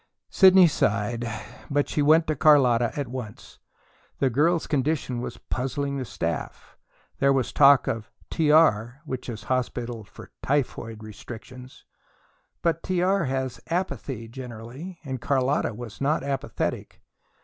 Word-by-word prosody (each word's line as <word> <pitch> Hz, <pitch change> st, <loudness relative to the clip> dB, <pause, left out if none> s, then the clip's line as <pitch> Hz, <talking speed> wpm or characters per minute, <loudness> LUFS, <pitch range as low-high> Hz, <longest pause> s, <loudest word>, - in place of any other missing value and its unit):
Sidney 190 Hz, -1 st, +7 dB
sighed, 115 Hz, -5 st, 0 dB, 0.4 s
but 145 Hz, 0 st, +1 dB
she 150 Hz, -, -1 dB
went 155 Hz, +3 st, +5 dB
to 155 Hz, -, -1 dB
Carlotta 125 Hz, -6 st, +4 dB
at 140 Hz, -, -2 dB
once. 120 Hz, -4 st, -8 dB, 0.6 s
The 135 Hz, -2 st, +1 dB
girl's 160 Hz, +7 st, +2 dB
condition 140 Hz, -4 st, -1 dB
was -, -, -6 dB
puzzling 140 Hz, +2 st, -3 dB
the 130 Hz, -, -3 dB
staff. 85 Hz, -5 st, -5 dB, 0.4 s
There 140 Hz, -, +4 dB
was 135 Hz, -3 st, 0 dB
talk 140 Hz, -1 st, +6 dB
of 110 Hz, -2 st, -3 dB, 0.2 s
"T.R." 150 Hz, -6 st, +3 dB
which 130 Hz, -3 st, -5 dB
is 110 Hz, -2 st, -6 dB
hospital 120 Hz, -2 st, -2 dB
for 100 Hz, -, -14 dB
"typhoid 115 Hz, -5 st, -2 dB
restrictions." 120 Hz, +4 st, -11 dB, 0.8 s
But 165 Hz, -1 st, +1 dB
T.R. 185 Hz, +1 st, +1 dB
has 130 Hz, -1 st, -3 dB
apathy, 145 Hz, -, -3 dB
generally, 125 Hz, +8 st, -9 dB
and 130 Hz, -4 st, -5 dB
Carlotta 135 Hz, -4 st, 0 dB
was 120 Hz, 0 st, -9 dB
not 145 Hz, +2 st, +1 dB
apathetic. 140 Hz, 0 st, -3 dB
130 Hz, 125 wpm, -25 LUFS, 120-150 Hz, 0.8 s, Sidney